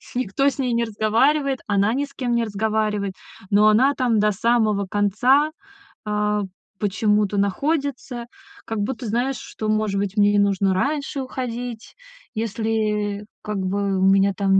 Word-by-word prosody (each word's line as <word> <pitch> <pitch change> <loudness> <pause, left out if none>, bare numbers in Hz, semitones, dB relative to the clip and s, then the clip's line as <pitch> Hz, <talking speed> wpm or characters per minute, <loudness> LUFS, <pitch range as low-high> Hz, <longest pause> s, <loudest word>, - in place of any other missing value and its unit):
никто 255 +3 +1
с 275 - -9
ней 250 -3 0
не 235 0 +1
разговаривает. 260 +6 +1
Она 205 +1 +2
ни 280 +3 0
с 275 - -18
кем 250 -3 -2
не 235 0 +2
разговаривает. 210 -2 -1 0.4
Но 205 +1 +5
она 255 +7 +4
там 245 -4 +1
до 210 0 +3
самого 215 -1 +1
конца, 215 +10 +2 0.5
а, 210 0 0 0.4
почему-то 210 0 +1
находится, 260 - -1 0.4
как 225 -1 -3
будто, 245 +4 -3
знаешь, 245 +5 0
что, 215 - -5
может 215 -2 +1
быть, 200 +1 -3
мне 205 0 +5
не 205 - +3
нужно 195 -1 +2
раньше 280 +7 -1
уходить, 245 -3 -5 0.4
если, 215 -2 -1 0.2
как 210 -1 -3
бы, 195 0 -1
у - - +1
меня 195 +1 +4
там 195 -1 +3
215 Hz, 150 wpm, -22 LUFS, 205-245 Hz, 0.5 s, Но